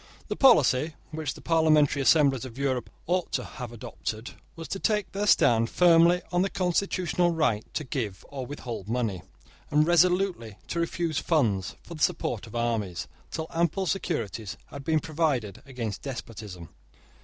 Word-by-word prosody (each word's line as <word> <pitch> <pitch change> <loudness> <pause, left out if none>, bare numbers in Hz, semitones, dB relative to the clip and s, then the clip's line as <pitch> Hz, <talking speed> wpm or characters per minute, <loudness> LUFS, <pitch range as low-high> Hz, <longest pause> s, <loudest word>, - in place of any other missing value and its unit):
The - - -1
policy 150 - +4 0.2
which 155 -3 -3
the - - -12
parliamentary 155 -3 +3
assemblies 135 -3 +4
of 130 -2 -9
Europe 130 -3 -1 0.2
ought 180 +1 0
to - - 0
have 125 -5 -8
adopted 110 0 -6 0.2
was 165 -1 -7
to 195 - -3
take 210 -2 0
their 205 +1 -2
stand 115 - +4
firmly 175 0 +5
on 175 0 +2
their 195 - +1
constitutional 180 -2 +1
right 155 -11 +1
to 155 - -1
give 115 - -4
or 135 -2 -5
withhold 120 -6 -6
money, 115 -7 -1 0.5
and 150 +1 +4
resolutely 175 - +2
to 170 - -2
refuse 170 -2 -1
funds 110 - +1
for - - -10
the 155 - -9
support 115 -4 0
of 115 - -11
armies, 105 -8 -1 0.2
till 160 - -4
ample 170 +3 +1
securities 115 - -3
had 140 - -8
been 160 +2 +2
provided 145 - -1
against 115 -6 -5
despotism. 105 - -7
145 Hz, 155 wpm, -27 LUFS, 115-170 Hz, 0.5 s, firmly